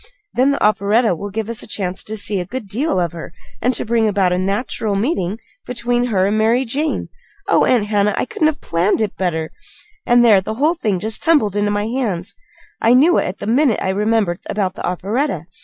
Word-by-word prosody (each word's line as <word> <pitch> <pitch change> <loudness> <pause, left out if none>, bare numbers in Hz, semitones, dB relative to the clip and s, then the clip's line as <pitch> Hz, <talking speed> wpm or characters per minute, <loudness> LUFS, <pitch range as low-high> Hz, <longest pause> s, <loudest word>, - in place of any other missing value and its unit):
Then 255 +3 +3
the 280 - 0
operetta 210 +1 +3
will 200 +5 -5
give 215 +1 -4
us 230 -1 -4
a - - -7
chance 190 -3 -3
to 220 +1 -4
see 205 -1 -1
a 180 - -3
good 235 0 -6
deal 240 - -1
of 170 -2 0
her, 170 -1 -8 0.3
and 250 - +2
to - - -2
bring 225 -1 +2
about 195 -3 +2
a - - 0
natural 200 +2 -1
meeting 200 - -1 0.3
between 245 0 0
her 195 -6 +1
and 205 +2 +1
Mary 235 +4 +2
Jane. 290 +6 -2 0.4
Oh, - - +4
Aunt 235 -5 +2
Hannah, 205 -1 +1
I - - 0
couldn't 310 +4 0
have 310 -2 -2
planned 170 +4 +1
it 215 -3 -1
better 160 -4 -2 0.5
and 240 0 +4
there 210 -4 +6
the 220 +3 -5
whole 300 +7 +2
thing 215 - -1
just 220 +3 -3
tumbled 285 - +2
into 205 0 +1
my 205 0 -1
hands! 220 -6 -2 0.5
I 230 +2 +5
knew 315 +7 +5
it - - -1
had 185 - -5
the - - -7
minute 245 +2 +2
I - - -2
remembered 205 -2 +1
about 195 -3 -1
the - - -8
operetta. 195 - -2
215 Hz, 220 wpm, -18 LUFS, 195-245 Hz, 0.5 s, there